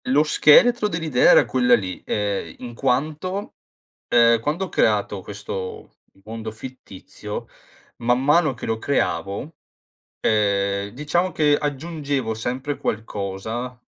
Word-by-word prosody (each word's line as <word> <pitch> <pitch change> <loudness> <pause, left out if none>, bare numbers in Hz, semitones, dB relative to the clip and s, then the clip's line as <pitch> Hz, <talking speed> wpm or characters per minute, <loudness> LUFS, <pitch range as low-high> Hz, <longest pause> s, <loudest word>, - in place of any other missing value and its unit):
Lo 145 +3 +3
scheletro 210 +10 +5
dell'idea 160 -9 +2
era - - +7
quella 125 -1 +4
lì, 95 -5 -4
ehm, 100 -5 -2
in 120 -2 -8
quanto, 155 - -2 0.5
ehm, 115 -1 +5
quando 155 +10 -2
ho - - -11
creato 105 - +1
questo 100 -2 -7 0.3
mondo 110 +1 -7
fittizio, 110 -4 -9 0.5
man 120 +2 +1
mano 150 0 +3
che 115 - -9
lo 110 0 -1
creavo, 110 - -2 0.7
ehm, 100 -2 +1
diciamo 170 +6 0
che 150 -2 +3
aggiungevo 145 -4 -3
sempre 125 +6 -3
qualcosa 110 +4 -4
125 Hz, 115 wpm, -22 LUFS, 105-150 Hz, 0.7 s, era